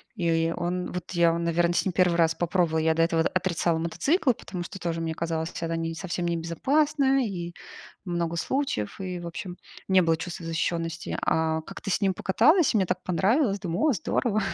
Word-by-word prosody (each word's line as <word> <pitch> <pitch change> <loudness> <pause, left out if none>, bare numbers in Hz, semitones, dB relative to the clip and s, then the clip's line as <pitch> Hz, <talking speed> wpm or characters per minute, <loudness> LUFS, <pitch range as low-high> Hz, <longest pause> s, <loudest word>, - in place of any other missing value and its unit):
И 165 -3 +1
он, 180 +1 -2
вот 180 -1 -5
я, 170 -2 +3
наверное, 170 +1 +1
с - - +1
ним 190 - +1
1 180 -1 +3
раз 165 -1 +3
попробовала. 170 -1 +1
Я 160 0 +2
до 165 - +1
этого 165 -1 +2
д - - +1
отрицала 175 -2 +1
мотоциклы, 255 - +1
потому 180 -4 -7
что 195 +3 -8
тоже 165 -2 -2
мне 165 -1 -2
казалось, 165 0 -2
что 165 - -4
это 165 0 -2
совсем 175 -2 -3
не 170 -1 0
безопасно. 270 - +1
И 175 -4 -5 0.5
много 170 -2 -2
случаев, 260 - -2
и, 180 -1 -4
в 170 - -6
общем, 180 +1 -6 0.3
не 190 -1 +6
было 165 -2 +3
чувства 175 0 -6
защищенности. 165 0 -2
А 160 0 +1
как-то 195 - -8
с - - +2
ним 195 -1 +2
покаталась, 275 - +3
и - - +3
мне 190 - +2
так 185 - -2
понравилось. 200 - +2
Думаю: 185 - 0
о - - +3
здорово! 215 +4 0
175 Hz, 200 wpm, -26 LUFS, 165-190 Hz, 0.5 s, не